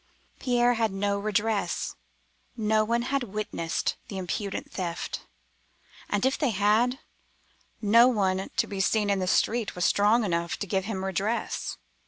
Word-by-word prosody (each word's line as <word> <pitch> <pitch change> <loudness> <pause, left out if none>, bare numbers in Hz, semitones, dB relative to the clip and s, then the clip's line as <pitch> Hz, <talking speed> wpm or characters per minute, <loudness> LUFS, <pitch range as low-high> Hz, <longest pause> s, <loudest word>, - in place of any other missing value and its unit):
Pierre 245 -1 +3
had 225 -3 +1
no 200 +1 0
redress; 210 -2 -1 0.6
no 215 -1 +2
one 235 +2 0
had 275 - +2
witnessed 210 -7 -2
the 195 - -6
impudent 190 +2 -4
theft, 175 -3 -4 0.8
and 205 +3 +1
if 265 - +1
they 285 - +2
had, 220 +5 +2 0.9
no 230 +4 +7
one 190 -5 +1
to - - +3
be 200 - -6
seen 205 +1 +2
in 200 - +1
the 185 - -1
street 225 +4 +1
was 180 - 0
strong 210 +4 +4
enough 170 -3 -1
to - - -3
give 190 0 -1
him 195 -3 -3
redress. 195 +5 -2
205 Hz, 150 wpm, -27 LUFS, 190-230 Hz, 0.9 s, no